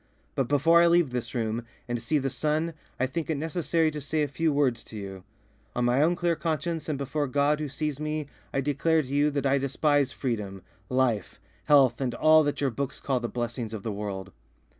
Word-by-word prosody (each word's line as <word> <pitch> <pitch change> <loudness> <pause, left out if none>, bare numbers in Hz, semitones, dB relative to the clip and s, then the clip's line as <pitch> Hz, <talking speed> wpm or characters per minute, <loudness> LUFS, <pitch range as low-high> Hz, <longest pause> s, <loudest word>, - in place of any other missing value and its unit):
But 135 - 0
before 165 +5 +5
I 170 - +6
leave 170 -5 +4
this 125 -1 -4
room 115 0 -1 0.2
and 120 -1 -2
see 155 - +1
the 135 -2 -1
sun 155 +4 0 0.3
I 130 - +3
think 160 +5 -4
it 155 - 0
necessary 165 +1 0
to 150 0 -5
say 155 +2 0
a - - 0
few 160 +3 0
words 135 -5 +1
to 110 - -9
you. 95 -2 -7 0.5
On 120 - +1
my 125 +3 +3
own 170 +3 +3
clear 170 -1 +1
conscience 160 0 -2
and 150 - -1
before 140 +2 -2
God 145 +3 +2
who 150 -2 -3
sees 150 0 -3
me 155 0 -2 0.3
I 135 - 0
declare 150 +3 +2
to - - -10
you 145 +2 +2
that 140 -2 -2
I 140 +1 +3
despise 140 0 +1
freedom, 105 -9 -3 0.3
life, 125 -6 0 0.3
health, 135 -4 +5
and 125 -2 -1
all 155 0 +6
that 145 - -1
your 140 -2 +1
books 140 +3 -4
call 135 -3 0
the 120 -1 -3
blessings 120 -2 -3
of 100 - -7
the 110 - -2
world. 100 -2 -5
140 Hz, 215 wpm, -27 LUFS, 120-155 Hz, 0.5 s, I